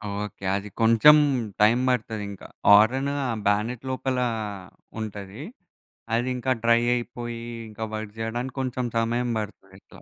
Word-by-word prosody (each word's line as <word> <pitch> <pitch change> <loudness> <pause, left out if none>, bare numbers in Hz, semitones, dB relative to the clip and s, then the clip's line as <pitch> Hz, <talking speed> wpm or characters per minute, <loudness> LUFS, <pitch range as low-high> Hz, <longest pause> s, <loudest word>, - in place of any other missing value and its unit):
Okay. 100 -1 -6
అది 100 +1 -4
కొంచెం 115 +7 +7 0.5
time 115 +4 +5
పడతది 110 -4 -1
ఇంకా. 100 - -10 0.2
హారెను 125 +7 +5 0.3
బ్యానెట్ 110 +4 0
లోపల 130 0 -2 0.8
ఉంటది. 105 +3 -7 0.7
అది 120 +2 0
ఇంకా 130 +1 -1
డ్రై 115 0 +4
అయిపోయి, 120 -1 -5 0.3
ఇంకా 110 +1 -7
వర్క్ 110 -1 -6
చేయడానికి 120 +3 -3
కొంచెం 130 -1 -2
సమయం 120 +2 0
పడుతుంది 95 -2 -8
ఇట్లా. - - -17
115 Hz, 125 wpm, -25 LUFS, 105-125 Hz, 0.8 s, కొంచెం